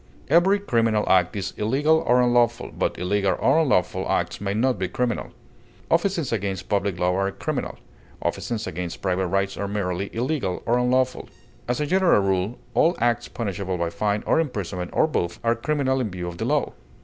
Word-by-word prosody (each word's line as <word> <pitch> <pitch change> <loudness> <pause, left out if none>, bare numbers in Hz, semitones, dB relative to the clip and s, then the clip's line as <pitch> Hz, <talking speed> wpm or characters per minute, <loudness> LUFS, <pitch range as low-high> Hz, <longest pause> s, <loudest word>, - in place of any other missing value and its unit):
Every 175 +6 +5
criminal 115 - +1
act 90 +2 +3
is 100 -1 -3
illegal 150 +9 +2
or 125 +1 +5
unlawful, 120 -1 +2
but - - -1
illegal 95 +2 0
or 160 - +4
unlawful 130 - +1
acts - - -1
may 100 0 -2
not 125 +3 +1
be 95 - 0
criminal. 125 +3 -2 0.6
Offenses 170 -3 +1
against 100 -3 -2
public 100 -3 0
law 90 +1 +1
are 95 +1 +1
criminal; 95 - -4 0.4
offenses 115 -3 -3
against 85 +1 -5
private 95 -1 0
rights 100 +2 -1
are 100 - -2
merely 100 -1 -2
illegal 120 - -2
or 120 +1 +2
unlawful. 125 +1 +1 0.4
As 120 0 -1
a 150 - 0
general 185 - +4
rule, 95 +4 0 0.2
all 170 +3 +3
acts 120 0 +1
punishable 100 -4 -3
by 85 -1 -1
fine 105 +3 -1
or - - +3
imprisonment 100 - -3
or - - +3
both, 85 - -2
are 115 0 +3
criminal 135 +1 0
in 115 - -1
view 90 -2 -5
of 85 -1 -7
the - - -1
law. - - 0
110 Hz, 180 wpm, -24 LUFS, 95-130 Hz, 0.6 s, Every